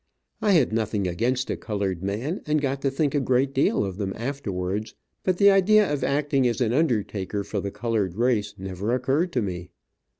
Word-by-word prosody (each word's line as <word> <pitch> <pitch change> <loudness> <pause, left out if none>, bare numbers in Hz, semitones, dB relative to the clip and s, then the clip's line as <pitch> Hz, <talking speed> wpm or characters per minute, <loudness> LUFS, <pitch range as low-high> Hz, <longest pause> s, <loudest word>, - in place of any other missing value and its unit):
I 205 - +3
had 140 -10 +3
nothing 105 -3 0
against 125 +9 -1
a - - -1
colored 100 -5 -3
man, 110 - -3
and 150 0 +2
got 135 -1 -2
to 140 - +1
think 140 +1 0
a 145 - +2
great 130 +1 +1
deal 135 -6 +2
of 95 -1 -5
them 100 -2 -2
afterwards, 105 -6 -3 0.3
but 185 -1 +1
the 200 +1 +7
idea 195 -2 +4
of 140 -3 -2
acting 140 -2 +1
as 120 - -1
an 120 -2 +1
undertaker 105 - 0
for 100 +1 -3
the 100 - -3
colored 105 -5 -2
race 115 -3 0
never 95 +5 -2
occurred 135 +8 0
to 125 - +1
me. 90 -2 -5
120 Hz, 195 wpm, -25 LUFS, 100-140 Hz, 0.3 s, the